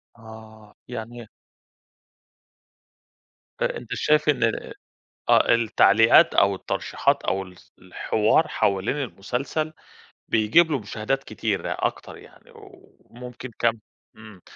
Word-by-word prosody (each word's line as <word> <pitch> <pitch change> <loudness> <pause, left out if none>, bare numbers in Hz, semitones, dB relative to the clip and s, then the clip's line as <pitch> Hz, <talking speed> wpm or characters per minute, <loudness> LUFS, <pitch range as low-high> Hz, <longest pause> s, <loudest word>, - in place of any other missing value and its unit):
آه 110 -1 -14
يعني 120 0 -7
إيه؟ 110 - -13 2.3
آآ، - - -1
أنت - - -8
شايف 150 0 +1
إن 135 -5 +1 0.9
آه - - +5
التعليقات 115 0 +4
أو 100 0 +3
الترشيحات - - -1
أو 95 0 -1
ال 90 -1 -13 0.2
الحوار 105 - 0
حوالين 100 +7 0
المسلسل، 135 +5 -4 0.6
بيجيب 135 +10 +3
له 140 - 0
مشاهدات 110 +6 -3
كتيرة 105 -4 -3
أكتر - - -4
يعني، - - -18
وممكن 125 0 -13
كم 115 -1 +3 0.4
امم 110 -4 -14
115 Hz, 105 wpm, -23 LUFS, 105-125 Hz, 2.3 s, آه